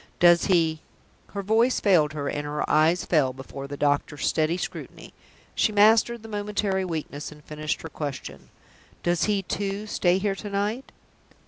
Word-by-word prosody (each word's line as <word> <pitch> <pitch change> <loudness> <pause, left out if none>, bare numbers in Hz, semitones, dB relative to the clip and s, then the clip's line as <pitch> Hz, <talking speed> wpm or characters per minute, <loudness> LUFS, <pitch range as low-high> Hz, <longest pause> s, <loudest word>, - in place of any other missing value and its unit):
"Does 175 0 +6
he 165 -4 +2 0.3
?" - - -35
Her 200 - -2
voice 225 +5 +3
failed 160 -7 +3
her, 145 -2 -3
and 145 - -2
her 150 0 -3
eyes 160 +3 +3
fell 140 -6 +2
before 135 +1 -8
the 145 0 -7
doctor's 145 0 0
steady 160 +2 +1
scrutiny. - - -7 0.4
She 215 - +2
mastered 220 +2 +4
the - - -9
momentary 205 -2 -1
weakness, 155 -5 -5
and 150 0 -14
finished 150 0 -4
her 160 - -6
question. 135 - -6 0.5
"Does 175 -1 +1
he, 205 -2 0
too, 200 +2 -3
stay 180 -3 +2
here 195 +1 0
to 205 +1 -7
night?" 205 +6 -2
175 Hz, 165 wpm, -25 LUFS, 150-205 Hz, 0.5 s, Does